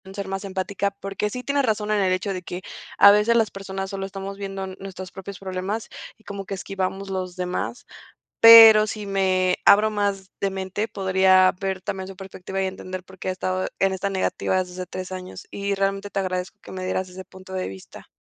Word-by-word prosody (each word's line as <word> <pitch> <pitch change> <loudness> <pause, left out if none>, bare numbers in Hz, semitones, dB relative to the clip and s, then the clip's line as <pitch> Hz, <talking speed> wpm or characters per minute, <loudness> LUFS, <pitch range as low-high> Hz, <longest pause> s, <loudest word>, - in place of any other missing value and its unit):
ser 200 -1 -4
más 195 +1 -4
empática, 195 +1 -2
porque 195 +1 -4
sí, 250 +4 -6
tienes 280 0 +1
razón 215 -2 -1
en 210 -1 +2
el 190 -1 +2
hecho 185 +2 -1
de 185 - -5
que 180 +1 -6 0.4
a 200 +1 +9
veces 210 +3 +3
las 220 -2 +2
personas 195 0 -5
solo 195 -1 -4
estamos 195 0 -7
viendo 195 -1 -5
nuestros 190 -1 -8
propios 195 0 -9
problemas 190 +3 -4 0.3
y 220 - -26
como 200 -1 -6
que 195 - -4
esquivamos 195 0 -4
los 185 -2 -4
demás. 180 +8 -4 0.5
Pero, 225 -2 +10
si 210 0 -5
me 185 -2 +2
abro 210 +2 +6
más 200 -2 -2
de 195 - 0
mente, 190 +3 -3
podría 190 -2 +4
ver 190 -1 -2
también 190 0 -4
su 195 - -9
perspectiva 190 0 -6
y - - +1
entender 185 -1 -7
por 190 +1 -16
qué 190 - -4
ha - - +1
estado 185 0 -2
en 195 0 +2
esta 190 +1 -2
negativa 190 0 0
desde 180 0 -12
hace 185 0 -5
3 185 +1 -7
años. 185 0 -8
Y 200 0 -2
realmente 195 +1 -1
te - - -1
agradezco 185 +2 -3
que - - -12
me 185 -1 -5
dieras 185 0 -2
ese 185 +1 -10
punto 190 0 -13
de 185 0 -2
vista. 95 -1 -11
195 Hz, 210 wpm, -23 LUFS, 185-200 Hz, 0.5 s, Pero